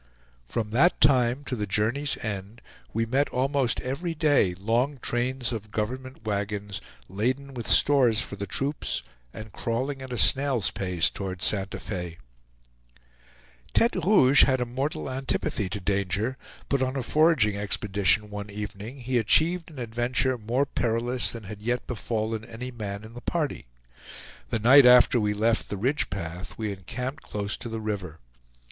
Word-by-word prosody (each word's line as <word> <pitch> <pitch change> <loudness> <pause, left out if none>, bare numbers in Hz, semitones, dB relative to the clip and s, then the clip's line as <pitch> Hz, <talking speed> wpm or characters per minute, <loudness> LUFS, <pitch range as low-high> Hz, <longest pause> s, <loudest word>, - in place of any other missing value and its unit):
From 110 - -3
that 150 +10 +4
time 125 0 +4
to 135 -2 -3
the 105 -3 -3
journey's 115 +8 0
end, 105 +1 -5 0.3
we 115 +1 0
met 135 +5 +1
almost 135 0 0
every 165 +6 -3
day 145 - +3
long 115 +9 0
trains 125 +1 -1
of 110 -2 -5
government 130 +5 -4
wagons, 100 -1 -3 0.3
laden 130 +8 -2
with 120 -3 -6
stores 130 -6 +5
for 100 - -2
the 100 0 -5
troops 140 +2 -2 0.3
and 110 - -9
crawling 130 +4 -2
at 130 -1 -8
a 125 - -3
snail's 135 -9 +2
pace 90 -4 0
toward 95 -2 -5
Santa 100 -1 0
Fe. 90 -4 -5 1.6
Tete 230 - +3
Rouge 145 -9 +6
had 130 -1 +2
a 125 - 0
mortal 130 +5 -3
antipathy 130 -6 -2
to 100 - -3
danger, 100 +5 -1 0.3
but 140 -1 +1
on 130 +1 0
a 135 - -1
foraging 150 -8 +3
expedition 100 +1 +1
one 105 0 -6
evening, 105 +5 -7
he 125 0 +1
achieved 165 - +3
an 155 - -14
adventure 120 +2 0
more 120 +4 0
perilous 120 -1 -1
than 115 -2 -7
had 100 +1 -9
yet 120 +3 -1
befallen 110 -2 -3
any 120 +3 -7
man 105 -3 -5
in 110 +1 -11
the 120 - -9
party. 150 - -2 0.8
The - - 0
night 125 +4 +7
after 125 0 +7
we 105 -1 0
left 115 +2 +1
the 100 - -3
Ridge 130 +9 0
path 90 -1 -6
we 110 -2 -2
encamped 125 - -5
close 100 -1 -3
to 120 - -7
the 115 0 -4
river. 100 -7 -4
115 Hz, 160 wpm, -26 LUFS, 105-130 Hz, 1.6 s, night